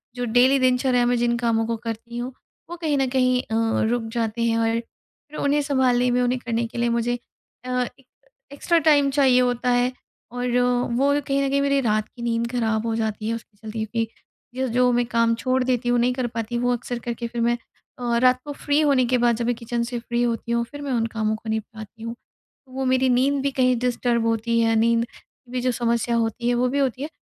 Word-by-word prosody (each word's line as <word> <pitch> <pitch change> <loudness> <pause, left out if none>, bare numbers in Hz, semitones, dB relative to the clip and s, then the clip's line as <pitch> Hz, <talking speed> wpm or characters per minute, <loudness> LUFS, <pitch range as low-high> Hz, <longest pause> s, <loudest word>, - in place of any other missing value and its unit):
जो 245 0 -2
डेली 250 +4 +4
दिनचर्या 250 -1 +2
में 245 - +2
जिन 235 0 +1
कामों 230 -1 +1
को 230 - -1
करती 230 +1 -6
हूँ, 245 +2 -4 0.4
वो 345 - -5
कहीं 310 -4 0
न 270 -1 +1
कहीं 255 -1 +2
अ, 220 - -4 0.4
रुक 240 -1 0
जाते 230 -1 -2
हैं 230 -1 +2
और 225 0 +1
फिर 290 +5 -16
उन्हें 285 +1 +2
सँभालने 255 -3 +2
में, 250 +1 +2
उन्हें 250 +1 +1
करने 230 -1 0
के 230 - -10
लिए 235 0 +1
मुझे 235 +1 0 0.5
अ, - - -6 0.3
एक 265 - -23 0.5
एक्स्ट्रा 335 +4 +1
टाइम 290 -3 +4
चाहिए 265 -3 +4
होता 245 0 0
है 245 +1 +2 0.4
और 245 0 -3 0.5
वो 280 +2 +3
कहीं 275 0 +1
न 275 - 0
कहीं 280 0 +1
मेरी 280 0 +2
रात 215 -2 0
की 240 - -13
नींद 235 0 -1
खराब 225 -3 0
हो 225 - 0
जाती 220 -1 -2
है, - - 0
उसके 220 -2 -12
चलते 220 +1 -5
भी। 225 -1 0 0.5
जो-जो 250 -1 +2
मैं 240 0 +2
काम 230 -1 +2
छोड़ 255 +2 0
देती 250 -1 0
हूँ, 245 0 +3
नहीं 245 +1 +2
कर 250 -1 -2
पाती, 230 0 -4
वो 245 +1 +1
अक्सर 245 0 -4
करके 235 0 -4
फिर 235 0 -4
मैं 240 +1 +2 0.4
अ, 240 -1 0
रात 255 +1 +4
को 295 - -5
फ्री 290 +1 0
होने 275 -4 +3
के 250 +1 +2
बाद, 240 -1 +3
जब 235 - -2
मैं 245 - +1
किचन 235 0 -3
से 240 0 -4
फ्री 235 0 -2
होती 235 0 -2
हूँ, 235 0 +1
फिर 290 0 -8
मैं 280 - -4
उन 230 -2 +1
कामों 220 -1 0
को 220 0 -8
निपटाती 220 0 -6
हूँ। 230 +1 -5 0.5
तो 260 - -21
वो 265 0 -2
मेरी 260 0 +2
नींद 270 +3 +2
भी 280 - 0
कहीं 255 -2 +2
डिस्टर्ब 240 -1 0
होती 230 +1 +1
है, 225 0 +2
नींद 230 +1 +3 0.5
भी 250 0 -2
जो 255 +1 +1
समस्या 235 0 0
होती 230 +1 0
है, - - +2
वो 250 +1 +1
भी 280 +3 -1
होती 265 -2 0
है। 300 - -4
245 Hz, 230 wpm, -23 LUFS, 230-255 Hz, 0.5 s, डेली